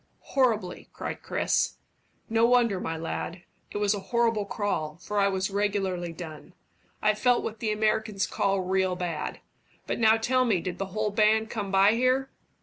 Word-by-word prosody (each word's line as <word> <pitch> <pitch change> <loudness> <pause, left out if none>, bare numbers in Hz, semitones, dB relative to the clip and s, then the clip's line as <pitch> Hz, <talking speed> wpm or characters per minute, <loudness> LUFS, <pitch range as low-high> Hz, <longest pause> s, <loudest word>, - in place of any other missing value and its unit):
"Horribly," 220 -9 +1
cried - - -5
Chris. - - 0 0.5
"No 225 0 +2
wonder, 235 -5 +3
my 165 -2 -3
lad. 165 +2 -5 0.3
It - - -5
was 205 0 +2
a 205 - -3
horrible 230 -3 +2
crawl, 185 -7 -2
for 205 +3 -2
I 200 - +4
was 190 0 -1
regularly 195 -4 -1
done. 165 0 -9 0.5
I 215 0 +4
felt 245 +3 +2
what 220 0 -5
the 220 - -1
Amurricans 215 -1 0
call 195 -1 0
real 185 0 +1
bad. 175 -3 -4 0.4
But - - -2
now 220 -1 +5
tell 255 +3 +2
me, 220 -7 +2
did 180 +1 -5
the 195 - -2
whole 210 +2 -2
band 215 +1 +3
come 205 -4 -3
by 195 +1 +5
here?" 255 +3 +1
205 Hz, 170 wpm, -27 LUFS, 185-225 Hz, 0.5 s, now